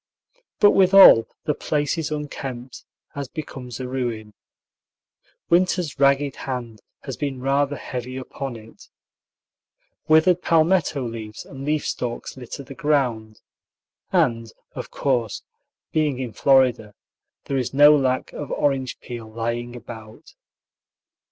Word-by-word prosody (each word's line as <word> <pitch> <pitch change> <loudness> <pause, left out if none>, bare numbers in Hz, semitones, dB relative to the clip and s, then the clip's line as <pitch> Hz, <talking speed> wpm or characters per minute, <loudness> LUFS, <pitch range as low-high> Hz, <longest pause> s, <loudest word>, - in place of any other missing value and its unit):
But 205 - +7
withal 190 - +7 0.2
the 150 - 0
place 145 +1 -1
is 160 -3 -3
unkempt, 135 -4 -6 0.3
as 140 -1 -5
becomes 130 -6 -8
a 130 - -4
ruin. 120 -5 -4 1.2
"Winter's 175 -3 +2
ragged 140 0 +3
hand" 120 -5 -6 0.2
has 135 -3 -5
been 140 -3 -3
rather 140 +2 +1
heavy 125 -1 -6
upon 130 0 -6
it. 110 0 -14 1.2
Withered 165 +3 +4
palmetto 165 -4 +2
leaves 110 -2 -8
and 135 -1 -9
leaf 150 0 0
stalks 120 -1 -4
litter 130 +2 -8
the 135 - -10
ground, 125 -8 -1 0.7
and 115 - +1 0.2
of - - -7
course, 120 -6 -1 0.5
being 150 -4 +1
in 125 -4 -5
Florida, 125 -6 +3 0.5
there 135 - -2
is 125 -3 -2
no 145 +2 +7
lack 130 -2 0
of 145 -2 -6
orange 135 -3 -1
peel 120 -3 -8
lying 115 +2 -3
about. 110 -2 -11
135 Hz, 120 wpm, -23 LUFS, 120-145 Hz, 1.2 s, But